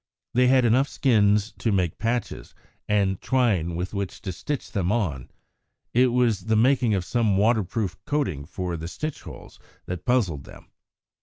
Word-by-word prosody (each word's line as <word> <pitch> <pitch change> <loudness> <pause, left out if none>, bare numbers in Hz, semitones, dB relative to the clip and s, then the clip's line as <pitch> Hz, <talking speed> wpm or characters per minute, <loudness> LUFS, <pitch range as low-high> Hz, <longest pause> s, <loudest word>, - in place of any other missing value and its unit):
They 125 +1 +4
had 130 -1 +4
enough 130 +4 +3
skins 105 -4 +2
to 115 - 0
make 90 -5 0
patches, 115 +2 -3 0.3
and 100 -3 +1
twine 100 -11 +1
with 90 +3 -4
which 100 -2 -4
to 95 - -3
stitch 140 - -5
them 95 -2 0
on. 85 - -1 0.6
It 125 +2 +5
was 120 -6 +1
the 110 0 +1
making 120 -1 +3
of 90 -2 -2
some 110 -2 +1
waterproof 105 -3 0
coating 140 - -1
for 90 +1 -4
the 80 +1 -6
stitch 155 - -5
holes - - -12 0.3
that 90 -1 -5
puzzled 100 - 0
them. - - -15
105 Hz, 160 wpm, -25 LUFS, 90-125 Hz, 0.6 s, It